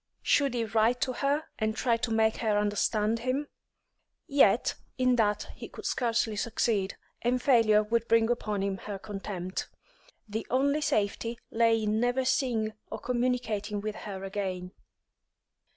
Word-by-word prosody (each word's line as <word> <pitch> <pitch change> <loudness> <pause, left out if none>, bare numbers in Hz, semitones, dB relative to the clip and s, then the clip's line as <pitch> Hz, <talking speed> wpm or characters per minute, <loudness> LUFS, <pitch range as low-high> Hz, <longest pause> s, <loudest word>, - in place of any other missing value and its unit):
Should 275 -3 +3
he 230 -1 0
write 225 +3 +2
to 255 - 0
her 285 +4 0 0.2
and 220 -1 0
try 235 0 +2
to 230 +1 -2
make 220 0 +2
her 215 -3 +1
understand 210 +2 +1
him? 255 +5 -1 0.8
Yet 280 0 +4 0.2
in 255 -1 +3
that 210 -2 +1
he - - -9
could - - -10
scarcely 230 -3 0
succeed, 215 -3 0 0.2
and 245 +1 +1
failure 225 -5 +4
would 230 +2 0
bring 225 0 +4
upon 210 -4 -1
him 195 -1 -1
her 205 -1 -5
contempt. 195 -2 -5 0.6
The 215 +2 -4
only 280 +4 +2
safety 230 -3 0
lay 225 -1 +3
in 215 +1 +1
never 245 +2 +1
seeing 230 -5 +1
or - - -5
communicating 240 -4 -1
with 215 +1 -3
her 195 -3 -7
again. 190 -2 -4
225 Hz, 150 wpm, -29 LUFS, 210-245 Hz, 0.8 s, Yet